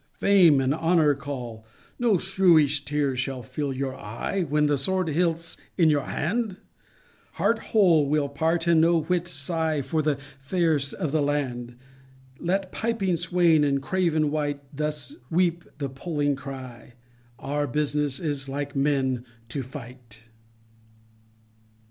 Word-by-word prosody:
Fame 180 -8 +5
and 135 +1 +1
Honor 160 -2 +3
call 125 -5 -6 0.4
No 235 -5 +3
shrewish 165 -6 +3
teares 140 -2 0
shall 130 -1 -3
fill 145 +4 -3
your 135 0 -3
eye 115 - -3
When 150 +1 +2
the 145 -1 +3
sword 185 +5 0
hilt's 165 +1 -1 0.2
in 160 -4 +5
our 145 - -2
hand,— 205 +4 -1 0.8
Heart 230 0 +1
whole 170 -9 +4
we'll 150 -1 +2
part, 160 +4 0
and 170 -2 +5
no 165 0 +4
whit 175 +2 0
sighe 155 -1 -2
For 160 -1 0
the 150 -2 0 0.3
fayrest 155 -2 0
of 155 - -2
the 155 0 +1
land; 130 -4 -2 0.6
Let 190 +2 -1
piping 220 -6 0
swaine, 170 -2 +3
and 140 -1 +2
craven 155 -1 +1
wight, 145 -2 -2
Thus 150 -2 -3
weepe 170 0 +1
and 140 -2 -4
poling 145 -1 -1
crye, 130 -3 -9 0.4
Our 145 +2 -2
business 145 0 0
is 145 -4 -3
like 145 +1 -4
men 135 -3 +1 0.3
to 135 - -3
fight. 120 -4 -11
150 Hz, 135 wpm, -25 LUFS, 135-170 Hz, 0.8 s, Fame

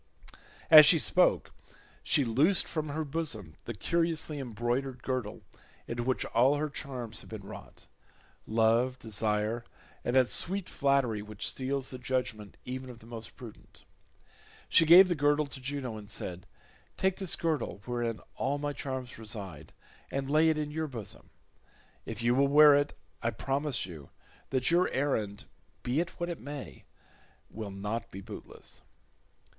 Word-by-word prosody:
As 155 -2 +11
she 165 - +8
spoke - - +3 0.5
she 145 - +3
loosed 140 - +2
from 155 -2 -3
her 155 +2 -2
bosom 135 - -3
the 120 - -5
curiously 160 - 0
embroidered 125 +1 -3
girdle 125 -5 -3 0.4
into 120 0 -3
which 130 +2 0
all 130 +5 +3
her 150 0 -2
charms 125 -6 -5
had - - -15
been 110 -3 -7
wrought—love, 115 +6 -2
desire, 110 +1 -1 0.4
and 120 - -1
that 130 -2 +4
sweet 195 +1 +1
flattery 135 -6 +1
which 105 -1 -5
steals 135 0 -2
the 130 - -7
judgement 125 -5 -3
even 130 +1 -5
of 125 - -10
the 115 - -17
most 115 -1 -9
prudent. 115 -4 -13 0.9
She 165 - +5
gave 180 +3 +10
the 180 - +1
girdle 145 -1 +2
to 140 -1 -9
Juno 130 -4 -4
and 105 -1 -11
said, 90 -4 -6 0.5
"Take 190 -1 +1
this 190 -4 0
girdle 155 -10 -2
wherein 120 -2 -2 0.2
all 145 - 0
my 145 0 -3
charms 130 -4 -5
reside 100 -9 -7 0.4
and 135 0 -3
lay 155 +2 +5
it 160 - +1
in 150 -1 -3
your 160 +1 -2
bosom. 115 -8 -8 0.8
If 115 - -5
you 120 +1 +3
will 140 +2 +4
wear 150 +1 +8
it 145 0 +1 0.2
I 115 - +1
promise 135 -1 -1
you 80 -6 -10 0.4
that 130 +2 +1
your 175 +2 +4
errand, 110 -8 -1 0.4
be 125 +5 0
it 170 0 -3
what 175 - -1
it 170 - -5
may, 145 0 -8 0.7
will 110 -2 -6
not 105 +4 -4
be 95 - -8
bootless." - - -10
130 Hz, 155 wpm, -30 LUFS, 115-145 Hz, 0.9 s, As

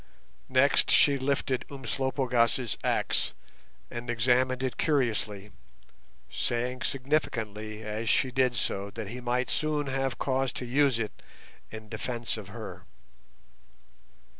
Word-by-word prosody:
Next 130 +1 +4
she 140 -1 +5
lifted 130 -1 0
Umslopogaas' 130 -3 +1
axe, - - +1 0.6
and 120 0 -6
examined 125 +2 +2
it 130 - -2
curiously, 110 -8 0 0.8
saying 125 +2 -1
significantly 110 -6 -2
as 110 +1 -3
she 130 - +3
did 125 -1 +2
so 100 -3 -1
that 105 0 -6
he 125 +2 -6
might 125 +1 0
soon 155 -1 0
have 135 -1 -1
cause 135 -1 0
to 125 - -4
use 135 0 +3
it 110 -2 -4 0.5
in 110 0 -9
defence 115 +2 -3
of - - -8
her. - - -8
125 Hz, 115 wpm, -29 LUFS, 115-135 Hz, 0.8 s, she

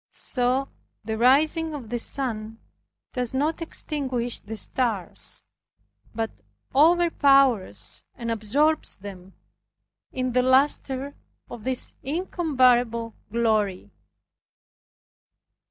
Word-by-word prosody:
So 255 +2 0 0.3
the 220 +1 -3
rising 305 +7 +3
of 250 -7 -8
the 240 - -1
sun 225 -4 -3 0.6
does 250 -1 -2
not 305 +5 0
extinguish 260 -7 -2
the 220 +2 -8
stars, 220 -6 0 0.7
but 225 0 -2 0.4
overpowers 275 - +3
and 235 -2 -4
absorbs 280 +9 +1
them 190 -2 -11 0.8
in 255 -1 -2
the 250 +1 +3
luster 265 +1 +2 0.4
of 225 -3 -9
his 260 -1 +1
incomparable 255 -8 +1 0.2
glory. 210 - 0
250 Hz, 90 wpm, -25 LUFS, 225-280 Hz, 0.8 s, rising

